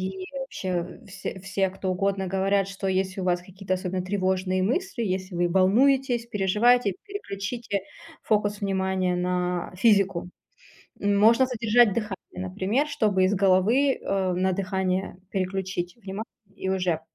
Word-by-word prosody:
и 185 Hz, -, -6 dB
вообще 185 Hz, -8 st, -4 dB
все 190 Hz, 0 st, -6 dB
все, 190 Hz, 0 st, 0 dB
кто 190 Hz, 0 st, -3 dB
угодно, 195 Hz, +1 st, 0 dB
говорят, 195 Hz, +1 st, +1 dB
что 195 Hz, 0 st, -4 dB
если 190 Hz, 0 st, -1 dB
у -, -, -3 dB
вас 175 Hz, -1 st, +1 dB
какие-то 190 Hz, +1 st, -4 dB
особенно 185 Hz, 0 st, -3 dB
тревожные 185 Hz, -1 st, 0 dB
мысли, 255 Hz, -, -1 dB
если 185 Hz, -1 st, -3 dB
вы 175 Hz, 0 st, +2 dB
волнуетесь, 240 Hz, +7 st, +3 dB
переживаете, 210 Hz, +1 st, +3 dB
переключите 225 Hz, -, -4 dB, 0.4 s
фокус 210 Hz, -1 st, +1 dB
внимания 190 Hz, -2 st, 0 dB
на 180 Hz, -1 st, -1 dB
физику. 195 Hz, -3 st, +3 dB, 0.7 s
Можно 215 Hz, +5 st, +4 dB
задержать 235 Hz, -3 st, +3 dB
дыхание, 210 Hz, -4 st, -3 dB, 0.3 s
например, 205 Hz, +10 st, 0 dB
чтобы 215 Hz, -10 st, +1 dB
из 190 Hz, -, +2 dB
головы, 200 Hz, +9 st, +3 dB
а, 190 Hz, -2 st, 0 dB
на 190 Hz, +1 st, +1 dB
дыхание 190 Hz, -1 st, -1 dB
переключить 185 Hz, -2 st, -2 dB
внимание, 205 Hz, -1 st, -6 dB, 0.3 s
и 190 Hz, -, -3 dB
уже 180 Hz, -4 st, 0 dB
195 Hz, 135 wpm, -26 LUFS, 185-210 Hz, 0.7 s, Можно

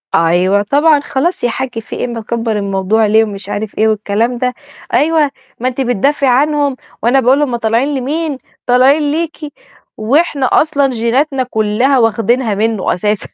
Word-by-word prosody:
أيوه، 180 Hz, +4 st, +2 dB
طبعًا 290 Hz, +7 st, +3 dB
"خلاص 290 Hz, +5 st, -2 dB
يا 240 Hz, -, +2 dB
حج 250 Hz, 0 st, -4 dB
في 225 Hz, -, -8 dB
إيه؟ -, -, -2 dB
مكبر 230 Hz, 0 st, -3 dB
الموضوع 200 Hz, +2 st, 0 dB
ليه؟" 220 Hz, +1 st, +4 dB
ومش 200 Hz, -2 st, -7 dB
عارف 210 Hz, +1 st, -5 dB
إيه، 220 Hz, -, +3 dB
والكلام 220 Hz, +3 st, -1 dB
ده 250 Hz, +1 st, -1 dB, 0.4 s
"أيوه، 300 Hz, +1 st, +2 dB, 0.3 s
ما 250 Hz, -, -1 dB
أنتِ 255 Hz, +1 st, -2 dB
بتدافعي 265 Hz, +3 st, +1 dB
عنهم 285 Hz, +2 st, +1 dB, 0.3 s
وأنا 245 Hz, +4 st, +3 dB
باقول 265 Hz, +3 st, +3 dB
هُم 265 Hz, -5 st, 0 dB
طالعين 230 Hz, +3 st, 0 dB
لمين؟ 290 Hz, +3 st, -2 dB, 0.3 s
طالعين 275 Hz, +4 st, +3 dB
ليكِ" 325 Hz, +1 st, -3 dB, 0.6 s
وإحنا 275 Hz, +5 st, +1 dB
أصلًا 285 Hz, -3 st, +2 dB
جيناتنا 255 Hz, +3 st, 0 dB
كلها 240 Hz, +3 st, +1 dB
واخدينها 225 Hz, 0 st, +1 dB
منه 220 Hz, -1 st, 0 dB
أساسًا. 210 Hz, +3 st, -2 dB
245 Hz, 155 wpm, -14 LUFS, 220-280 Hz, 0.6 s, ليه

